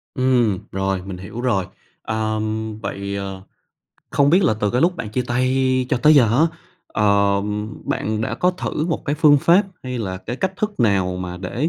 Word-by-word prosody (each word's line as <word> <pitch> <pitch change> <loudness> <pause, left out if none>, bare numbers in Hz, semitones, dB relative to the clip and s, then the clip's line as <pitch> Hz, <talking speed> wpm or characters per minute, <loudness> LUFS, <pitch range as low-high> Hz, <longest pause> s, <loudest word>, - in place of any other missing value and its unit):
Ừm, 125 -7 +2
rồi, 95 0 -1
mình 95 -2 -6
hiểu 105 +6 -7
rồi. 110 -8 +1 0.4
Ờm, 110 0 -2
vậy, 100 -1 -4
ờ, 95 -1 -5 0.7
không 140 0 +3
biết 185 +2 +4
là 110 - +3
từ 105 - +1
cái 125 +4 +1
lúc 180 +2 +2
bạn 110 - -5
chia 125 +2 -1
tay 130 +1 +1
cho - - +1
tới 150 +6 +5
giờ 135 -5 +6
á, 160 - +5 0.4
ờ, 100 -1 +2 0.4
bạn 110 0 -2
đã 115 - -2
có 180 - +2
thử 175 -3 -3
một 165 - -2
cái 145 - 0
phương 145 -1 +5
pháp 175 +8 +4 0.2
hay 125 -1 -4
là 95 -4 -3
cái 120 +7 -6
cách 190 +4 -1
thức 210 - -3
nào 95 -5 +2
mà 90 -1 -5
để 115 - -2
115 Hz, 195 wpm, -21 LUFS, 100-140 Hz, 0.7 s, giờ